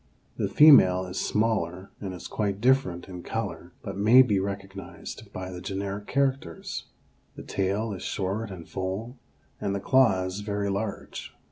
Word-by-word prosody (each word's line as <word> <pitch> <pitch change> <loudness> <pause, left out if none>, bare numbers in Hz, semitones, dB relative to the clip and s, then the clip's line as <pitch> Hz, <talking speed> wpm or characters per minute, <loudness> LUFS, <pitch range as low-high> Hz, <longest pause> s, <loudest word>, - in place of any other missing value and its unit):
The - - 0
female 95 -12 +7
is 90 0 -4
smaller 100 -4 0
and 95 -2 -4
is 90 - -8
quite 100 -2 -2
different 125 -8 +2
in 90 -2 -8
color, - - -4
but - - -5
may 115 +6 +7
be 105 -6 +1
recognized 95 0 -6
by 95 0 -6
the 90 -1 -7
generic 100 +2 -4
characters. 135 -11 -1 0.5
The - - -8
tail 100 +3 -1
is 95 - -7
short 100 +3 -2
and 90 -4 -9
full, 100 +7 -4 0.4
and 100 0 -1
the - - -1
claws 95 -6 +3
very 100 -1 -2
large. 100 +1 -5
100 Hz, 150 wpm, -27 LUFS, 95-110 Hz, 0.5 s, female